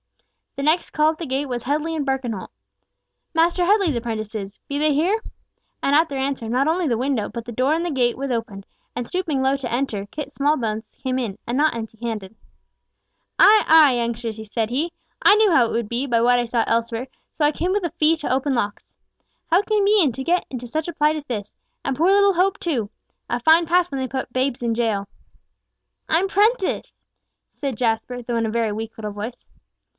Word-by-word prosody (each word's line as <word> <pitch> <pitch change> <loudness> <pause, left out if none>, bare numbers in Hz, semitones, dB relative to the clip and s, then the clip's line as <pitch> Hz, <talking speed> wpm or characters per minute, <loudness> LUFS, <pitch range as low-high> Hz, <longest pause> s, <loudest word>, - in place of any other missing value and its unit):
The 275 - -4
next 315 +4 +2
call 305 +1 +3
at 320 - -9
the 335 - -5
gate 265 +2 -1
was 245 -3 -4
Headley 305 +4 -1
and 295 -3 -2
Birkenholt—"Master 270 - -3
Headley's 385 - +3
prentices—Be 220 +3 -5
they 305 0 +3
here?" 365 +10 +1 0.6
And 280 - +2
at 320 +2 +4
their 275 - -4
answer, 265 -4 -2
not 255 +4 +1
only 335 +1 +1
the 235 -4 +1
window, 255 -3 -1
but 230 0 -7
the 240 - -7
door 255 +6 +1
in 335 - -1
the 350 - -2
gate 245 -4 +1
was 275 0 -3
opened, 220 -4 -4 0.3
and 245 - -3
stooping 325 -6 -1
low 265 +1 +2
to 260 -4 -5
enter, 230 -5 -2
Kit 285 +5 -6
Smallbones 235 -7 -1
came 260 -1 0
in, 220 -6 -3
and 240 - -1
not 300 -1 +2
empty 220 -1 -7
handed. 220 -3 -5 1.0
"Ay, 425 +1 +7
ay, 310 -4 +7
youngsters," 230 -2 -4
said 225 0 -1
he, 305 +7 -1 0.3
"I 405 - +7
knew 425 -2 +4
how 255 -8 +5
it - - -5
would 230 -2 -1
be, 240 +5 -2
by 235 -3 +2
what 245 +1 +4
I 240 - 0
saw 235 -1 +1
elsewhere, 230 +2 -1 0.3
so 305 - +1
I 295 - +4
came 350 +5 -2
with 400 -2 0
a 335 - -2
fee 325 0 +2
to 305 - -4
open 270 +1 0
locks. 205 -3 -3 0.6
How 350 +4 +5
came 410 -1 +1
ye 400 -9 +4
to 265 +3 -6
get 350 +5 +1
into 250 -2 -6
such 315 +7 -3
plight 300 0 +3
as 300 -2 -6
this? 210 -5 -5 0.3
And 275 - 0
poor 330 +7 +3
little 400 0 +5
Hope 370 +2 +1
too! 245 - -2 0.4
A 240 - -1
fine 320 +6 +5
pass 355 +1 +3
when 270 -1 -2
they 260 - -1
put 260 -1 -5
babes 255 -1 -1
in 235 -1 +1
jail." 220 -4 0 1.0
"I'm 345 +5 +2
prenticed!" 415 +1 0 0.5
said 275 -5 -4
Jasper, 240 +1 -1
though 235 0 -3
in 230 -1 +1
a - - -3
very 230 -1 0
weak 220 +1 -6
little 210 -2 -5
voice. 210 +4 -7
265 Hz, 205 wpm, -22 LUFS, 230-320 Hz, 1.0 s, Ay